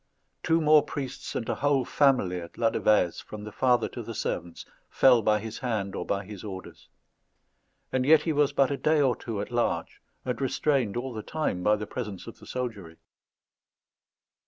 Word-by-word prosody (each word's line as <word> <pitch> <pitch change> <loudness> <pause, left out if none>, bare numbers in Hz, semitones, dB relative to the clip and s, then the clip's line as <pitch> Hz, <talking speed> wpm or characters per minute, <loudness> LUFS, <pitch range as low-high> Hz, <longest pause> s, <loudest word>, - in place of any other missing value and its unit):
Two 165 0 +2
more 155 0 +6
priests 135 -3 -6
and 115 - -3
a - - 0
whole 140 -2 +1
family 125 -11 +2
at 85 - -10
Ladevèze, 110 -5 +2
from 105 -1 -9
the 105 - -7
father 125 0 +2
to 120 - -7
the 115 0 -7
servants, 85 -5 -4 0.2
fell 125 -3 +5
by 110 -1 +3
his 110 +1 -7
hand 105 -6 -2
or - - -4
by 100 0 -1
his 100 -2 -9
orders; 95 -3 -9 1.0
and 130 - +1
yet 155 +4 +5
he 160 - 0
was 145 -1 +3
but 140 -1 +2
a 140 - -1
day 155 +2 +2
or 130 -4 +3
two 110 -3 -5
at 105 - -6
large, 120 -1 -1 0.2
and 125 +1 -3
restrained 135 -4 0
all 125 +1 -4
the 110 - -5
time 150 -10 -2
by 105 +3 +3
the 105 0 -5
presence 105 -5 -6
of - - -11
the - - -14
soldiery. 105 -10 -5
120 Hz, 185 wpm, -27 LUFS, 105-135 Hz, 1.0 s, more